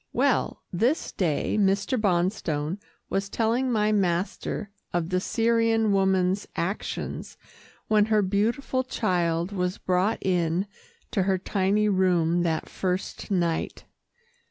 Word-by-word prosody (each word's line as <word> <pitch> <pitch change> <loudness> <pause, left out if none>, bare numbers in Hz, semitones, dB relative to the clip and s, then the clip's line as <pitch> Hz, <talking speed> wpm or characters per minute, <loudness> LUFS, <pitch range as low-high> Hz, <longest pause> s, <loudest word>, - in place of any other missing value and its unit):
Well, - - +1
this 240 - +1
day 170 +1 0
Mr. 200 +4 +2
Bonstone 180 -5 0 0.3
was 195 0 -1
telling 240 +4 +1
my 215 -2 +2
master 195 +1 -1 0.2
of 175 -1 -1
the 185 0 +1
Syrian 225 +1 +2
woman's 190 0 +2
actions 190 +5 -4 0.5
when 210 -1 +4
her 215 -1 +2
beautiful 225 +7 0
child 175 -7 0
was 180 -2 -1
brought 185 +4 +1
in 175 0 +1 0.5
to 195 - +1
her 190 0 +2
tiny 200 +2 +1
room 175 -4 +2
that 165 -2 -1
first 185 0 -3
night. 170 -4 -1
190 Hz, 115 wpm, -26 LUFS, 180-215 Hz, 0.5 s, when